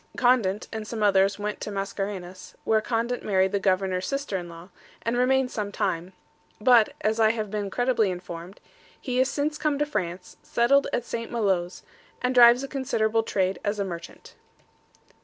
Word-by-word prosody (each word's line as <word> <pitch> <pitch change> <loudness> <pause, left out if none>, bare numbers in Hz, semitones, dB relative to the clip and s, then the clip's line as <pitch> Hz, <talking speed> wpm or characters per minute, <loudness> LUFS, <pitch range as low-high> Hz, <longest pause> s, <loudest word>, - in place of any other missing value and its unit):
Condent 235 -6 +2
and 220 -1 -5
some 220 -1 -3
others 195 -1 +3
went 210 0 -4
to - - -4
Mascarenhas, 195 -2 -5
where 220 -1 +2
Condent 235 +2 -1
married 190 -2 +1
the 200 - 0
governor's 190 -1 0
sister 275 -7 -3
in 175 -2 -4
law, 170 +2 -12 0.3
and 230 +1 -1
remained 255 +1 +2
some 205 -2 -3
time; 185 -2 -2 0.5
but, 230 0 +5
as 220 +1 0
I 220 -1 +5
have 215 -3 -4
been 205 -2 -2
credibly 245 -2 +1
informed, 180 0 -7 0.4
he 250 -2 -2
is 260 +1 +3
since 300 +2 -2
come 300 -2 0
to 295 - +1
France, 180 -10 -4
settled 275 +4 +2
at 240 - -1
St. 230 0 -5
Maloes, 190 -6 -1 0.4
and 250 0 0
drives 245 +1 +7
a - - -4
considerable 225 -5 0
trade 190 -3 -1
as 205 0 -1
a 200 - -1
merchant. 170 -2 -9
210 Hz, 175 wpm, -26 LUFS, 190-245 Hz, 0.5 s, drives